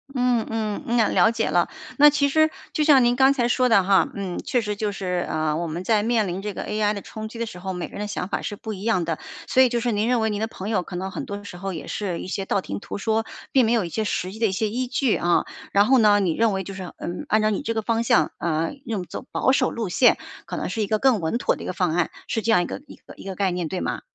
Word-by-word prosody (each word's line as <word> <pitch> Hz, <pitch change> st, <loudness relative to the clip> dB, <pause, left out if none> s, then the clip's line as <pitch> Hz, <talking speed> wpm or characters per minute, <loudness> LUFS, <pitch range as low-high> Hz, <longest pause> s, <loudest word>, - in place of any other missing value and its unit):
嗯 250 Hz, -2 st, +2 dB
嗯， 225 Hz, +3 st, -1 dB
啊， 220 Hz, -, +4 dB
了 -, -, +4 dB
解 230 Hz, -1 st, -1 dB
了。 -, -, +2 dB, 0.3 s
那 295 Hz, +1 st, +9 dB
其 285 Hz, -1 st, +2 dB
实 315 Hz, +2 st, +4 dB, 0.2 s
就 305 Hz, -, +1 dB
像 285 Hz, -4 st, +6 dB
您 240 Hz, 0 st, +3 dB
刚 265 Hz, +1 st, +5 dB
才 240 Hz, -3 st, +1 dB
说 250 Hz, +1 st, +2 dB
的 200 Hz, -5 st, +5 dB
哈， 195 Hz, 0 st, +4 dB
嗯， 190 Hz, -3 st, -4 dB
确 245 Hz, -, +1 dB
实 210 Hz, -1 st, -3 dB
就 210 Hz, 0 st, -2 dB
是， 180 Hz, -3 st, -2 dB
呃， 155 Hz, -1 st, 0 dB
我 170 Hz, +2 st, -2 dB
们 170 Hz, +3 st, -4 dB
在 215 Hz, +1 st, +2 dB
面 225 Hz, -1 st, +1 dB
临 180 Hz, +2 st, -3 dB
这 210 Hz, +1 st, -3 dB
个 -, -, -4 dB
AI 210 Hz, 0 st, 0 dB
的 200 Hz, -, -5 dB
冲 220 Hz, 0 st, -7 dB
击 230 Hz, -, -10 dB
的 235 Hz, -, -2 dB
时 180 Hz, -5 st, -9 dB
候， 190 Hz, 0 st, -4 dB
每 180 Hz, -, -4 dB
个 -, -, -19 dB
人 -, -, -8 dB
的 210 Hz, -, -2 dB
想 180 Hz, -3 st, -3 dB
法 -, -, -2 dB
是 205 Hz, -, -4 dB
不 215 Hz, +1 st, -6 dB
一 190 Hz, -, -8 dB
样 220 Hz, -7 st, +1 dB
的。 165 Hz, -1 st, -2 dB, 0.3 s
所 260 Hz, -, +4 dB
以 255 Hz, -, +6 dB
就 240 Hz, 0 st, 0 dB
是 240 Hz, +1 st, 0 dB
您 210 Hz, +1 st, 0 dB
认 250 Hz, -1 st, +2 dB
为 220 Hz, 0 st, +1 dB
您 205 Hz, -, -2 dB
的 220 Hz, -, 0 dB
朋 200 Hz, -2 st, -7 dB
友 205 Hz, -5 st, +1 dB
可 180 Hz, +1 st, -8 dB
能 190 Hz, +2 st, -4 dB
很 -, -, -5 dB
多 200 Hz, 0 st, -6 dB
时 190 Hz, -3 st, -9 dB
候 195 Hz, 0 st, -4 dB
也 160 Hz, -, -6 dB
是 185 Hz, -5 st, -3 dB
一 -, -, -7 dB
些 195 Hz, +1 st, -3 dB
道 200 Hz, -, +1 dB
听 100 Hz, -, -5 dB
途 -, -, -6 dB
说， 220 Hz, +2 st, 0 dB, 0.3 s
并 265 Hz, -, +5 dB
没 225 Hz, -, +1 dB
有 220 Hz, -6 st, +2 dB
一 -, -, -5 dB
些 220 Hz, +6 st, -2 dB
实 185 Hz, -3 st, -2 dB
际 215 Hz, -, -10 dB
的 225 Hz, -, +3 dB
一 -, -, -1 dB
些 205 Hz, +3 st, 0 dB
依 250 Hz, +4 st, -2 dB
据 260 Hz, -2 st, +1 dB
啊。 175 Hz, 0 st, +2 dB, 0.3 s
然 200 Hz, +1 st, +5 dB
后 260 Hz, +1 st, +5 dB
呢， 210 Hz, -2 st, +5 dB
你 180 Hz, -5 st, +1 dB
认 225 Hz, +1 st, +2 dB
为 190 Hz, 0 st, -2 dB
就 195 Hz, +1 st, -7 dB
是， 185 Hz, -2 st, -7 dB
嗯， 175 Hz, +1 st, -5 dB
按 215 Hz, -, +3 dB
照 215 Hz, -, +3 dB
你 200 Hz, -, -1 dB
这 230 Hz, -, -2 dB
个 220 Hz, -, 0 dB
方 230 Hz, 0 st, 0 dB
向， 155 Hz, -9 st, +3 dB
啊， 165 Hz, -1 st, 0 dB, 0.2 s
用 210 Hz, -5 st, -2 dB
走 180 Hz, -, -8 dB
保 -, -, +2 dB
守 260 Hz, -1 st, +2 dB
路 225 Hz, -5 st, -3 dB
线 245 Hz, +7 st, +4 dB, 0.3 s
可 -, -, -4 dB
能 -, -, -3 dB
是 225 Hz, -, -2 dB
一 205 Hz, -, 0 dB
个 215 Hz, -, +1 dB
更 255 Hz, -2 st, +3 dB
稳 165 Hz, +7 st, -1 dB
妥 -, -, +1 dB
的 -, -, -11 dB
一 -, -, -6 dB
个 -, -, -2 dB
方 180 Hz, -3 st, 0 dB
案， 175 Hz, 0 st, +1 dB, 0.2 s
是 225 Hz, -, -1 dB
这 225 Hz, +2 st, +1 dB
样 180 Hz, -4 st, +4 dB
一 -, -, -3 dB
个 -, -, -6 dB
一 -, -, -11 dB
个 -, -, -15 dB
一 -, -, -12 dB
个 195 Hz, -1 st, -5 dB
概 195 Hz, -1 st, +1 dB
念， 175 Hz, -2 st, -2 dB
对 180 Hz, +3 st, -3 dB
吗？ -, -, -3 dB
210 Hz, 340 characters per minute, -23 LUFS, 185-230 Hz, 0.3 s, 那